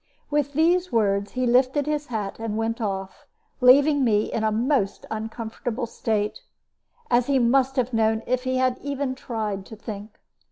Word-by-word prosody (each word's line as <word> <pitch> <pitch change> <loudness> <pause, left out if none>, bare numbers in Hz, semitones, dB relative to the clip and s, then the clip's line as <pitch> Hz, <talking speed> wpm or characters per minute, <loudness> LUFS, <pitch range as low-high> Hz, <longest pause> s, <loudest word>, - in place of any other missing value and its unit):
With 290 -1 0
these 350 +4 +2
words, 200 -3 +1
he 255 0 0
lifted 255 +4 +3
his 300 -1 -2
hat 215 -4 -4
and 225 -1 -3
went 225 +2 -2
off, 195 -2 -4 0.3
leaving 280 +3 +6
me 215 -3 +1
in 225 - -1
a 220 - +2
most 230 -2 0
uncomfortable 225 +2 -4
state, 215 - -2 0.7
as 240 0 +3
he 280 -1 +3
must 260 +2 +3
have 255 -2 0
known 220 0 +2
if 250 0 0
he 255 0 0
had 255 -1 +1
even 280 -1 -2
tried 215 -6 -4
to 220 - -9
think. 210 -1 -8
240 Hz, 165 wpm, -24 LUFS, 220-265 Hz, 0.7 s, leaving